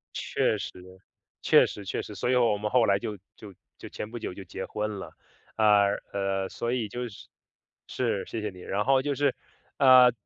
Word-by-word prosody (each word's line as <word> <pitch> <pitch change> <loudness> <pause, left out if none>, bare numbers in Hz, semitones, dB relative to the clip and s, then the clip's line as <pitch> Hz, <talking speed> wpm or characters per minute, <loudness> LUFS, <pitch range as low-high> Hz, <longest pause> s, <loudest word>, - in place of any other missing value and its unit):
确 - - 0
实， - - -5 0.7
确 - - +6
实 100 - -8
确 95 - -3
实。 105 - -9
所 120 - -2
以 130 - +3
我 115 -4 +3
们 105 0 -3
后 125 -3 +4
来 100 -1 +3
就 105 +1 -5 0.2
就 105 -3 -12 0.2
就 - - -10
前 105 - -6
不 120 - -7
久 110 - -5
就 95 - -9
结 95 +2 -6
婚 105 -1 -3
了。 - - -8 0.5
呃， 105 -2 +5 0.2
呃， 95 -1 -1
所 120 0 -3
以 120 -4 -1
就 120 +3 -5
是 100 - -13 0.6
是， - - -1
谢 115 - -5
谢 105 - -2
你， 90 -1 -13
然 105 +4 -2
后 135 0 +4
就 145 +1 -1
是 140 -1 +1 0.4
呃， 130 -2 +8
105 Hz, 215 characters per minute, -27 LUFS, 100-125 Hz, 0.7 s, 呃